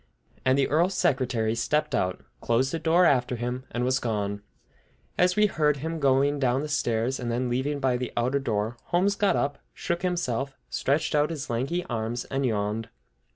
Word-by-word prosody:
And 130 +1 +3
the 140 - +3
Earl's 170 +6 +2
secretary 120 -4 +1
stepped 150 +5 0
out, 90 -5 -1 0.2
closed 125 +3 +1
the 165 - -2
door 170 +3 +4
after 125 -4 +2
him, 125 +2 -4
and 120 - -2
was 130 +1 +2
gone. 100 -4 -2 0.7
As 180 0 +3
we 210 - +5
heard 150 -7 +2
him 160 +3 -4
going 140 +1 +3
down 130 0 +2
the - - -3
stairs, 120 -3 0
and 120 -2 -3
then 125 +1 -1
leaving 135 +4 -1
by 130 -2 +1
the 125 -1 -4
outer 125 +4 +1
door, 110 -2 -2
Holmes 185 +3 +2
got 205 -6 +2
up, 140 +3 -1 0.2
shook 170 0 -2
himself, 140 -7 -2
stretched 150 +3 0
out 150 0 +3
his 150 -7 -5
lanky 140 +10 -1
arms, 120 0 -3
and 135 0 -1
yawned. 105 0 -2
130 Hz, 185 wpm, -26 LUFS, 120-150 Hz, 0.7 s, we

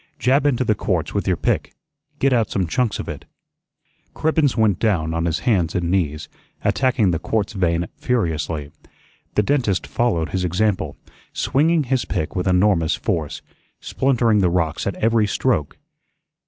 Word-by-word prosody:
Jab 135 +4 +2
into 130 -3 +1
the 110 - +2
quartz 90 -5 -2
with 100 - -2
your 90 -3 +2
pick; - - -1 0.4
git 135 -2 +2
out 115 -4 +2
some 95 - 0
chunks 115 +6 0
of - - -6
it." - - -7 0.9
Cribbens 155 -5 +1
went 110 -4 +2
down 85 -8 +1
on 85 0 -1
his 85 - -1
hands 95 -9 +1
and 85 -1 0
knees, 75 -6 -1 0.4
attacking 125 -7 +2
the 80 - -1
quartz 105 +3 -1
vein 85 -3 0
furiously. 80 - -1 0.6
The 105 - +3
dentist 120 -7 0
followed 85 -11 0
his 95 +3 -2
example, 90 -3 0 0.4
swinging 160 +3 +2
his 130 -1 0
pick 80 - -3
with 90 0 -1
enormous 90 -4 +3
force, 80 -3 -3 0.4
splintering 120 -5 +1
the 90 -3 +3
rocks 85 -3 -1
at - - -2
every 115 -1 +2
stroke. 100 - 0
100 Hz, 155 wpm, -21 LUFS, 85-120 Hz, 0.9 s, The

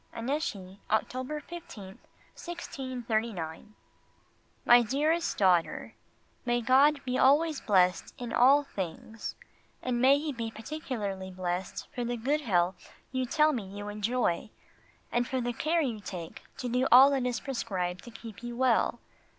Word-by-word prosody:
ANNECY, 225 -7 -3
October 255 +7 -1
15th, 265 - -10 0.3
1639. 230 - -4 0.9
MY 240 0 +8
DEAREST 300 +8 0
DAUGHTER, 180 -4 +2 0.5
May 240 -1 +1
God 275 +4 +4
be 255 0 -1
always 295 +3 +4
blessed 185 -3 +2
in 240 -3 -5
all 270 +5 +6
things 205 - -6 0.5
and 245 -1 -1
may 270 +2 +6
He 300 +1 -3
be 230 -2 -4
particularly 220 -6 -5
blessed 180 0 -4
for 245 - -3
the 240 0 -2
good 285 +7 0
health 180 -6 0 0.2
you 260 -1 -1
tell 305 +4 +3
me 230 -7 -3
you 205 +2 -7
enjoy, 210 -2 -1 0.6
and 240 0 +1
for 260 - -1
the 245 0 -2
care 325 +7 +1
you 240 -7 -2
take 175 -5 -8
to 250 - -4
do 250 +2 +1
all 265 +3 +9
that 265 -3 +1
is 240 -3 -1
prescribed 185 -9 -3
to - - -10
keep 225 -2 -10
you 240 0 -6
well. 245 -2 +2
240 Hz, 140 wpm, -29 LUFS, 205-270 Hz, 0.9 s, all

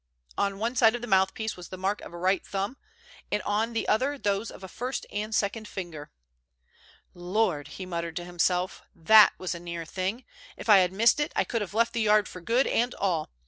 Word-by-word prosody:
On 200 -1 0
one 230 +4 -2
side 230 -2 +5
of 240 - -5
the 240 - -5
mouthpiece 190 +3 +1
was 180 -1 -10
the 185 - -7
mark 195 +3 -1
of - - -10
a 175 - -9
right 185 +2 +1
thumb, 200 +5 -3 0.6
and 210 - +1
on 220 +4 0
the 225 - -2
other 265 +7 +1
those 205 -2 -1
of - - -12
a - - -6
first 250 +8 -4
and 210 +1 -3
second 210 +2 -1
finger. 170 -7 -7 1.0
"Lord!" 175 -4 -1
he 190 - -6
muttered 170 -2 -4
to 175 0 -4
himself, 180 +1 0
"that 215 +6 +7
was 185 - -3
a 170 - -7
near 170 -1 -6
thing. 190 +9 -3 0.3
If - - -8
I 205 -2 +9
had 180 -1 +2
missed 230 +8 +4
it, 295 - -1
I - - +3
could 230 - -2
have 205 0 -5
left 230 +1 +2
the 230 - 0
Yard 210 -1 +4
for 180 - -10
good 235 +9 +2
and 245 +2 0
all. 175 -6 -1
200 Hz, 220 wpm, -27 LUFS, 180-225 Hz, 1.0 s, I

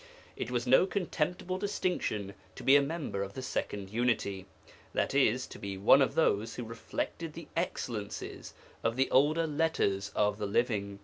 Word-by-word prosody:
It - - -4
was 120 -1 -1
no 135 +9 +5
contemptible 180 -1 -2
distinction 180 - -1 0.2
to - - -9
be 135 - +6
a 145 - +7
member 140 -8 -3
of 100 0 -4
the 130 - -5
Second 100 -5 -3
Unity, 110 -5 0 0.5
i.e. 135 -4 +3
to 130 - -8
be 100 -1 -5
one 110 +8 +6
of 135 +1 +2
those 115 -8 +2
who 125 - -4
reflected 115 +7 -4
the 165 +1 -9
excellences 115 - -4 0.3
of 115 0 +1
the 135 +1 +1
older 155 +5 +4
'Letters 150 -11 0
of 105 0 +2
the 105 - -1
Living.' 100 -2 0
125 Hz, 165 wpm, -31 LUFS, 105-155 Hz, 0.5 s, a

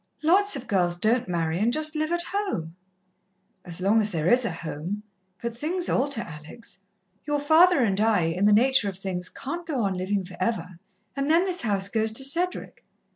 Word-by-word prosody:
Lots 385 +4 +4
of 265 - -6
girls 175 -3 +1
don't 225 +6 +1
marry, 165 -1 -1
and 225 +4 +2
just 310 +3 0
live 310 +1 -1
at 345 0 +1
home." 355 - -3 0.9
"As 175 -1 -4
long 210 +4 +3
as 210 0 -1
there 160 -2 -1
is 245 +5 +4
a 220 - -1
home. 165 +5 -5 0.4
But 235 -1 -3
things 345 +8 -1
alter, 270 -2 0
Alex. 165 +6 -10 0.5
Your 295 -1 0
father 320 +2 +5
and 200 -2 +1
I, 220 -4 +3
in 165 +4 0
the - - +5
nature 235 0 +4
of 190 - -8
things, 185 -2 -4
can't 340 +6 -6
go 275 -8 -1
on 195 -1 0
livin' 190 +1 -2
for 180 0 -11
ever, 185 -4 -2 0.4
and 275 +1 -2
then 335 +4 +4
this 365 -2 -2
house 200 -4 0
goes 220 +1 0
to 270 - -1
Cedric. 345 +7 -1
220 Hz, 195 wpm, -25 LUFS, 185-290 Hz, 0.9 s, father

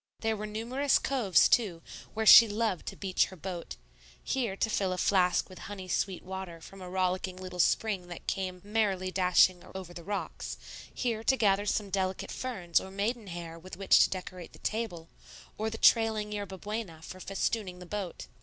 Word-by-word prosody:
There 225 -1 +1
were 215 0 -5
numerous 245 +6 +1
coves 235 -10 +3
too, 185 -8 +1 0.3
where 220 0 -1
she 230 +1 +11
loved 210 -3 -1
to - - -4
beach 190 -2 +1
her 190 - -11
boat, 180 0 -6 0.5
here 235 -7 -1
to 210 - 0
fill 195 -4 0
a - - -4
flask 180 -1 +2
with 185 -2 -12
honey 190 -2 -7
sweet 185 0 -1
water 190 -3 -6
from 195 +4 -12
a 180 - -7
rollicking 185 0 -1
little 185 -1 -8
spring 195 -1 +1
that 175 -1 -9
came 185 -2 -3
merrily 200 -3 0
dashing 185 -1 +4
over 185 -2 -7
the 170 - -9
rocks, 200 +3 -4 0.3
here 230 -3 -2
to 265 - +4
gather 205 -2 +2
some 205 -1 -1
delicate 190 -1 -1
ferns 190 -10 0
or 190 - -8
maiden 210 +3 -2
hair 170 -2 -7
with 185 +1 -10
which 195 0 +5
to - - +2
decorate 185 -2 -7
the - - -13
table, 210 -7 -3 0.5
or 220 +1 -2
the 225 - -6
trailing 220 -3 +4
yerba 200 -2 -5
buena 205 -5 -5
for 185 - -9
festooning 195 0 -2
the 180 - -10
boat. 195 -1 -5
190 Hz, 185 wpm, -30 LUFS, 180-215 Hz, 0.5 s, she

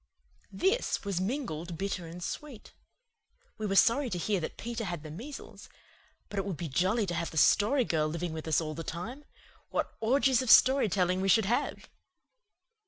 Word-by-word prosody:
This 390 - 0
was 195 -3 -1
mingled 180 - -3
bitter 190 -2 -3
and 175 +2 -8
sweet. 275 -1 -7 0.9
We 215 - -2
were 195 - -1
sorry 250 +6 +4
to 180 - -3
hear 195 +3 0
that 160 - -5
Peter 235 0 -4
had 175 -5 -4
the 155 - -8
measles; 260 - -9 0.6
but 205 - -4
it 195 - -2
would 190 -6 -4
be 170 - -4
jolly 190 - +1
to 175 - -3
have 170 -1 -2
the 160 - -8
Story 235 - +4
Girl 155 -5 +1
living 170 +1 -3
with 160 0 -6
us 160 - +3
all 155 -2 -4
the 165 - -6
time. 225 - -6 0.4
What - - -2
orgies 260 +2 +3
of 255 - -3
story 260 0 +6
telling 185 0 +1
we 195 - 0
should 220 +2 +5
have! 230 +5 -1
195 Hz, 185 wpm, -30 LUFS, 170-235 Hz, 0.9 s, story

